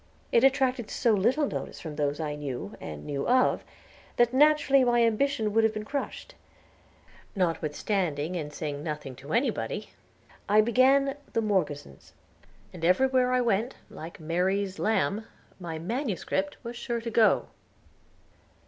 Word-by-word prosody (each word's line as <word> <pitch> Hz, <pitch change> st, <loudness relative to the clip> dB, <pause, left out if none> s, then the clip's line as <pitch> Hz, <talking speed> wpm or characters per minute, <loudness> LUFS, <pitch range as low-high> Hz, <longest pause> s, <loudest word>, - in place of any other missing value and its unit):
It 235 Hz, -, +4 dB
attracted 260 Hz, -4 st, +2 dB
so 235 Hz, -3 st, +2 dB
little 240 Hz, +9 st, +2 dB
notice -, -, -5 dB
from 155 Hz, -3 st, -7 dB
those 145 Hz, 0 st, -1 dB
I 150 Hz, -2 st, -2 dB
knew, 135 Hz, -8 st, -5 dB
and 75 Hz, -2 st, -7 dB
knew 140 Hz, -1 st, -3 dB
of, 255 Hz, +1 st, +3 dB, 0.5 s
that 240 Hz, 0 st, +3 dB
naturally 290 Hz, -1 st, +5 dB
my 240 Hz, -1 st, +3 dB
ambition 230 Hz, -1 st, +1 dB
would 225 Hz, +1 st, +4 dB
have 220 Hz, -1 st, +2 dB
been 215 Hz, 0 st, -4 dB
crushed. 280 Hz, +4 st, -5 dB, 1.0 s
Notwithstanding, 165 Hz, -1 st, -1 dB
and 150 Hz, -4 st, -4 dB
saying 145 Hz, -1 st, -4 dB
nothing 150 Hz, -4 st, -5 dB
to 140 Hz, +3 st, -10 dB
anybody, 245 Hz, -, -1 dB, 0.6 s
I 210 Hz, +1 st, +5 dB
began 270 Hz, +4 st, +3 dB, 0.2 s
"The 230 Hz, -, +1 dB
Morgesons," 150 Hz, -, -2 dB, 0.6 s
and 175 Hz, -3 st, -10 dB
everywhere 255 Hz, +7 st, +3 dB
I 255 Hz, 0 st, +3 dB
went, 230 Hz, +1 st, 0 dB, 0.2 s
like 165 Hz, +2 st, -9 dB
Mary's 185 Hz, +4 st, -1 dB
lamb, 215 Hz, 0 st, 0 dB, 0.3 s
my 170 Hz, -3 st, -5 dB
MS. 220 Hz, -, -3 dB, 0.4 s
was 235 Hz, +1 st, -6 dB
sure 235 Hz, -1 st, -3 dB
to 230 Hz, 0 st, -5 dB
go. 225 Hz, -1 st, +3 dB
215 Hz, 140 wpm, -28 LUFS, 160-250 Hz, 1.0 s, naturally